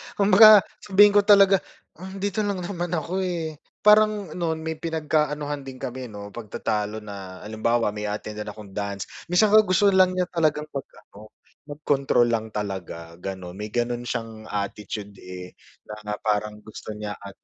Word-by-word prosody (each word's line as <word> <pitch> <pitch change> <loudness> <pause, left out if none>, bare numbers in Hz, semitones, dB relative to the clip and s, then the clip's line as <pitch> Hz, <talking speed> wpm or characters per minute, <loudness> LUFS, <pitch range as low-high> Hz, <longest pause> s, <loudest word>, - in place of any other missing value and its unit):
Kumbaga 210 +1 +8 0.2
sabihin 205 0 +5
ko 205 - +5
talaga, 200 -2 +7 0.4
"Um, 190 +1 -8
dito 205 +1 -1
lang 200 -3 -1
naman 175 -1 -3
ako 170 +4 -2
eh." 165 -5 -3 0.2
Parang 210 -4 +4
nun 160 -2 -3
may 160 -1 -4
pinagka-anuhan 150 -2 -1
din 135 - -7
kami 130 -1 -6
'no, 105 -2 -9
pagtatalo 105 -1 -3
na 95 -3 -9
halimbawa 110 +1 0
may 105 0 -5
a-attendan 105 +1 -5
din - - -4
akong 105 -2 -12
dance, 100 -1 -4 0.2
minsan 180 +5 +3
nga 215 - +8
gusto 200 0 +3
lang 185 -1 +4
niya 185 - +1
talagang 155 -3 +1
mag 140 - -5 0.2
ano, 105 +1 -15 0.3
mag-control 145 -4 +1
lang 110 -1 -1
talaga, 85 -5 -5
ganon, 95 -1 -6
may 105 - -4
ganun 120 +2 -2
siyang 115 -2 -5
attitude 105 0 -5
eh, 90 0 -9 0.3
na 105 0 -6
parang 105 0 -2
gusto 110 0 -9
niya 105 -1 -5
at 100 -1 -11
125 Hz, 160 wpm, -24 LUFS, -, 0.4 s, Kumbaga